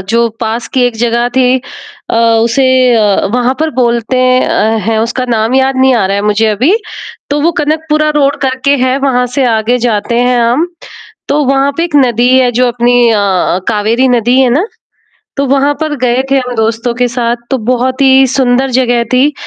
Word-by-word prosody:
जो 235 +2 +1
पास 225 +1 -3
की 260 - +2
एक 245 - -3
जगह 235 +1 0
थी। 255 0 +3 0.5
अ, - - -1 0.3
उसे 260 +3 +1 0.3
अ, 210 -3 +1
वहाँ 250 +1 0
पर 315 0 0
बोलते 235 0 0
हैं 255 0 +2
अ, 220 +1 0
है 225 -1 0
उसका 240 +3 -3
नाम 225 +1 0
याद 265 0 +1
नहीं 260 0 +3
आ 225 -5 +1
रहा 195 +1 -1
है 200 - -2
मुझे 210 +1 +1
अभी। 250 - +1 0.6
तो 290 +1 0
वो 325 +3 +2
कनकपुरा 305 0 -1
रोड 285 -1 +1
करके 270 +1 0
है 260 0 0
वहाँ 255 -3 0
से 275 - +2
आगे 220 +3 0
जाते 235 -1 -1
हैं 245 0 +1
हम, 240 +8 +1 0.6
तो 295 +1 0
वहाँ 275 +1 +1
पे 335 - 0
एक 335 -4 -2
नदी 245 -3 +2
है। 255 -1 +2
जो 250 - +3
अपनी 240 0 +2
अ, 200 -4 0
कावेरी 225 +4 0
नदी 245 +1 +2
है 260 -2 +2
ना? 300 - 0 0.7
तो 280 - 0
वहाँ 275 +2 +1
पर 310 -1 -2
गए 250 +1 +1
थे 275 - +2
हम 250 -1 -4
दोस्तों 225 +2 -1
के 250 +1 0
साथ 240 -1 -1
तो 265 - +1
बहुत 255 +1 -1
ही 265 0 +4
सुंदर 260 0 +1
जगह 245 -2 +1
थी 265 +4 +2
250 Hz, 195 wpm, -10 LUFS, 235-270 Hz, 0.7 s, ही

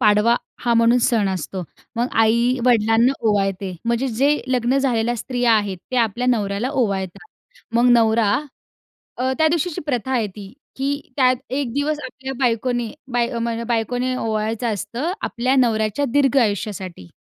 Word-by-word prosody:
पाडवा 215 +1 +4 0.3
हा 235 -1 +3
म्हणून 230 +2 +4
सण 220 -5 +1
असतो. 185 0 -4 0.3
मग 240 +2 0
आई-वडिलांना 235 +1 +3 0.2
ओवाळते. 195 -2 0
म्हणजे 235 +3 0
जे 275 +6 +2
लग्न 250 +1 +1
झालेल्या 240 -3 +1
स्त्रिया 245 +1 +1
आहेत, 205 -4 +1
त्या 250 -2 +3
आपल्या 230 +3 -2
नवऱ्याला 210 +1 -1
ओवाळतात. 200 - -2 0.5
मग 240 +1 +4
नवरा 225 -3 +4 0.9
अ, 260 +1 0
त्या 315 - +4
दिवशीची 335 0 -1
प्रथा 260 -2 -2
आहे 235 -4 +1
ती, 200 -1 -9 0.2
की 280 +2 -1 0.2
त्यात 255 -2 +4 0.2
एक 265 -4 -1
दिवस 295 +2 -1
आपल्या 265 +1 -6
बायकोने 240 -1 0 0.2
बाय 240 0 0
म्हण 230 0 -2
बायकोने 245 +2 0
ओवाळायचं 220 +1 -2
असतं 235 - -3
आपल्या 255 +3 0
नवऱ्याच्या 220 0 +1
दीर्घ 280 -2 +3
आयुष्यासाठी. 200 - -3
235 Hz, 145 wpm, -21 LUFS, 215-255 Hz, 0.9 s, पाडवा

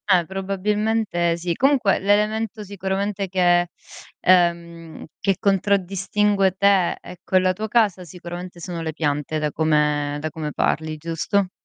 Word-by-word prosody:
Eh 180 -3 +4
probabilmente 195 -1 -1
sì. 170 0 -2
Comunque 260 - +2
l'elemento 210 +2 0
sicuramente 195 0 -3
che 175 -1 +3 0.5
ehm, 170 -2 +1
che 195 -1 +1
contraddistingue 195 0 +1
te 200 -3 +3
e 180 - -11
quella 185 0 +2
tua 215 +4 -4
casa 210 -5 +2
sicuramente 175 +1 -9
sono 170 -1 -5
le 160 -1 -3
piante 150 0 -2
da 150 -1 -1
come 150 -2 +1
da 155 +1 -3
come 155 0 -5
parli, 155 +2 -1
giusto? 165 +5 -1
185 Hz, 130 wpm, -22 LUFS, 165-200 Hz, 0.5 s, Eh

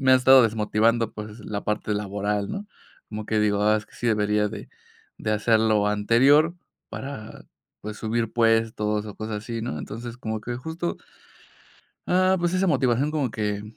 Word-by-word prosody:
me 130 -1 +4
ha - - +8
estado 130 0 +7
desmotivando, 110 +1 +1
pues, 105 +1 -8
la 105 -1 -5
parte 105 0 -1
laboral, 105 0 -2
¿no? 205 +1 -5 0.4
Como 105 -1 -6
que 110 - 0
digo, 105 -1 +1
ah, 110 0 +4
es 105 - -9
que - - -22
sí 120 - -3
debería 105 -1 +2
de 105 -1 -8 0.5
de 110 - -1
hacer 110 +1 +3
lo 110 -2 +2
anterior 135 +10 +4 0.4
para, 135 -6 -8 0.4
pues, 105 +1 -6
subir 115 0 -2
puestos 115 -2 +1
o 105 - -8
cosas 110 -1 -4
así, 115 -1 -5
¿no? 75 -10 -4
Entonces, 115 +7 -7
como 110 -2 -4
que 120 +2 -5
justo 160 +6 -4 1.1
ah, 185 +1 +3
pues 175 +1 0
esa 185 0 +2
motivación 130 0 +2
como 145 -6 -1
que 105 -2 -2
110 Hz, 175 wpm, -25 LUFS, 105-125 Hz, 1.1 s, ha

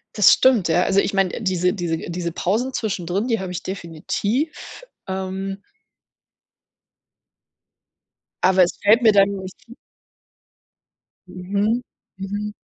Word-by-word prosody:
Das 210 -4 +7
stimmt, 245 -9 +3
ja. 175 +2 +2
Also 195 0 +2
ich 200 - 0
meine, 195 +2 0
diese 180 -2 +1
diese 175 -4 -2
diese 170 -1 -3
Pausen 225 +10 -1
zwischendrin, 195 0 -2
die 230 -4 0
habe 185 -1 -5
ich 180 - -5
definitiv, 200 - -4 0.2
ähm 190 +1 -4 2.8
aber 185 0 +5
es 175 - -1
fällt 220 +4 +5
mir 220 - +7
dann 200 -1 +4
nicht 190 -2 -6 0.2
f 235 - -12 1.5
Mhm, 200 +6 -1 0.4
mhm. 205 +2 -4
195 Hz, 120 wpm, -21 LUFS, 180-210 Hz, 2.8 s, Das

